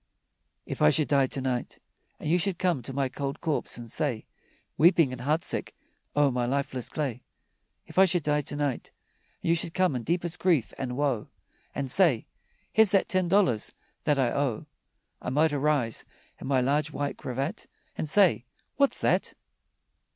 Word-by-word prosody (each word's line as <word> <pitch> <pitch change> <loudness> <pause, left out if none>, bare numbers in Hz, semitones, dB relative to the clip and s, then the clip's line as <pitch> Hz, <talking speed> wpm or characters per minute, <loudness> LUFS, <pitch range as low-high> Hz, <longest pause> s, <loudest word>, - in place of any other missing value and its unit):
If - - -6
I 75 - +7
should 150 - +2
die 140 -2 +3
to 135 - -3
night 130 -2 -3 0.4
And - - -6
you 175 +3 +3
should 190 -1 0
come 175 -8 0
to 125 - -5
my 135 0 0
cold 135 +2 -4
corpse 155 -6 -1
and 120 -2 -7
say, 135 -8 -1 0.5
Weeping 165 -3 +5
and 130 -1 -6
heartsick 150 +5 -1 0.4
o'er 145 -1 +4
my 125 -1 -1
lifeless 130 -2 -2
clay 135 -6 -3 0.6
If - - -2
I 190 - +8
should 175 -3 0
die 150 0 +1
to 145 - -6
night, 145 -3 -2 0.5
And - - -1
you - - +4
should 165 0 -3
come 185 -6 +2
in 125 - -2
deepest 170 +5 -1
grief 165 - +1
and 125 -1 -3
woe 140 -7 0 0.5
And 135 -2 -2
say: 160 - +3 0.5
"Here's 220 -2 +6
that 195 0 +2
ten 185 -1 +1
dollars 170 - +2 0.3
that 150 - +2
I 130 -3 +2
owe," 140 -6 -1 0.6
I - - -4
might 150 +4 +2
arise 145 -5 0 0.4
in - - -7
my 135 -2 +2
large 145 +4 +1
white 145 -2 -3
cravat 135 - -4 0.3
And 155 - -3
say, 180 - +4 0.3
"What's 280 -1 +3
that?" - - +1
145 Hz, 175 wpm, -27 LUFS, 130-165 Hz, 0.6 s, I